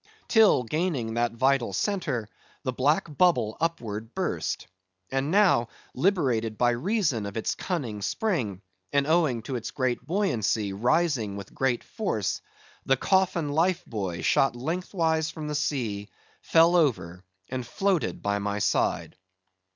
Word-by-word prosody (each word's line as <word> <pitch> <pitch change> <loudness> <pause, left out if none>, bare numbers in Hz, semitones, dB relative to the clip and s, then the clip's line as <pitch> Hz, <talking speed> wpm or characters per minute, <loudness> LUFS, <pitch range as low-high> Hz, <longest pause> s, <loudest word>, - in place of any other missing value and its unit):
Till, 220 - +5
gaining 140 -4 -1
that 120 0 0
vital 130 -3 +1
centre, 145 - -1 0.4
the 130 -3 -2
black 140 +5 +2
bubble 170 -12 +3
upward 115 -9 -3
burst; - - -2 0.5
and 135 +2 0
now, 185 - +4 0.3
liberated 125 - +1
by 120 0 +3
reason 140 - 0
of 100 - -6
its 115 - -1
cunning 125 - -3
spring, 110 - -1 0.3
and, 140 -1 +2
owing 155 -8 +2
to 130 - -4
its 115 -2 -4
great 130 -2 -1
buoyancy, 115 - 0
rising 120 - +1
with 100 -1 -9
great 130 -2 0
force, 110 - -2 0.4
the 135 - +2
coffin 180 -2 +1
life 175 +4 +1
buoy 95 -6 -4
shot 135 +6 +3
lengthwise 160 +2 -1
from 155 -1 -6
the 150 - -3
sea, 115 -9 -2 0.3
fell 165 +2 +4
over, 95 - +1 0.3
and 130 -1 -3
floated 195 0 0
by 100 0 0
my 100 0 -2
side. 105 - 0
130 Hz, 135 wpm, -27 LUFS, 110-165 Hz, 0.5 s, Till